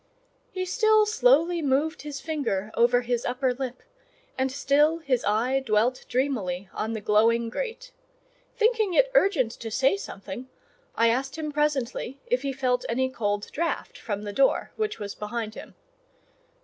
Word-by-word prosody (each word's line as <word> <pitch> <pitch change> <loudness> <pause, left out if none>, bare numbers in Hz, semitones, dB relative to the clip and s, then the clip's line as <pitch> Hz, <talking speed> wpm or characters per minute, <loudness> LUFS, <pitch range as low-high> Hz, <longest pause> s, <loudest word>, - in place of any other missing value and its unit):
He 370 -1 -3
still 435 +2 +4
slowly 355 -6 +3
moved 295 +4 0
his 290 -2 -6
finger 235 -11 -2
over 245 +1 +4
his 245 -1 -1
upper 250 +1 0
lip, 255 -1 -6 0.5
and 260 0 0
still 285 +4 +3
his 275 -7 -1
eye 235 +6 +2
dwelt 230 +2 +1
dreamily 200 -9 -1
on 220 +1 -3
the 220 - -4
glowing 230 +3 +3
grate; - - -5 0.7
thinking 440 -5 +2
it - - +4
urgent 365 - +3
to 230 -1 -7
say 265 - +2
something, 245 - -8 0.5
I 230 0 +4
asked 265 +5 -1
him 305 -1 -3
presently 280 -3 -1
if 250 +1 0
he 275 0 -2
felt 255 -2 0
any 260 +2 +1
cold 205 -4 -2
draught 335 0 -3
from 205 -2 -4
the 205 -1 -5
door, 270 +5 +2
which 430 -1 -2
was 205 -1 -5
behind 215 +1 -4
him. - - -11
260 Hz, 155 wpm, -26 LUFS, 230-315 Hz, 0.7 s, still